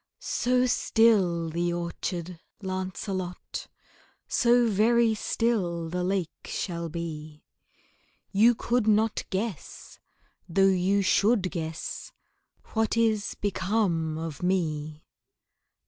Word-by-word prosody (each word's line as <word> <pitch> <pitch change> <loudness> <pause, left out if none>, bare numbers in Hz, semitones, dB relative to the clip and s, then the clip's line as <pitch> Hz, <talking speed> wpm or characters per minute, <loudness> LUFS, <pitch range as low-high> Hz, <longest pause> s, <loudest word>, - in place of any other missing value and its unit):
So 250 +1 +1
still 195 -9 +3
the 175 +1 0
orchard, 175 0 -4 0.2
Lancelot, 185 -1 -4 0.6
So 240 0 +4
very 225 +2 +3
still 190 -7 -1
the 180 +1 -2
lake 185 -3 0 0.2
shall 170 -3 -3
be, 155 -2 -6 0.9
You 225 +4 +5
could 235 -1 0
not 215 +1 +2
guess 195 -4 -5 0.5
though 195 +3 +3
you 195 +1 +3
should 200 0 +3
guess 160 -2 -5 0.6
What 225 0 +1
is 220 -3 +1
become 190 -5 0
of 160 -2 -5
me. 155 -4 -1
185 Hz, 95 wpm, -27 LUFS, 170-220 Hz, 0.9 s, You